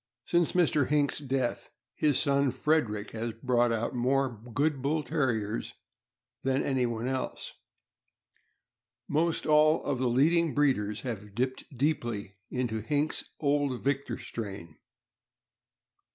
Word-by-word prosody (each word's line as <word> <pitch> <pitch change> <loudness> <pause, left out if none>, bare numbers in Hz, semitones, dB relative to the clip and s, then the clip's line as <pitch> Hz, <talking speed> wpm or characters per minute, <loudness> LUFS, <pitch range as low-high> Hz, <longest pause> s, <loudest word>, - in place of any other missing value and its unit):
Since 175 -2 +2
Mr. 155 -6 +3
Hinks' 145 0 +1
death, 135 -3 -2 0.2
his 150 -3 +2
son 140 -2 +2
Frederick 120 -7 0
has 115 +1 -3
brought 120 +1 +2
out 115 0 -1
more 125 -2 0
good 145 +2 +1
Bull 150 +3 0
Terriers 120 -7 -1 0.7
than 135 0 +1
anyone 120 -4 0
else. 130 0 -3 1.5
Most 160 +3 0
all 155 +1 +4
of 140 -3 -1
the 130 -1 +1
leading 160 +6 +3
breeders 110 -8 +1
have 105 -5 -6
dipped 130 +2 -3
deeply 120 -8 -1
into 120 -4 -2
Hinks' 145 +6 -1
Old 145 -3 0
Victor 140 0 -1
strain. 95 -8 -7
130 Hz, 115 wpm, -29 LUFS, 115-145 Hz, 1.5 s, all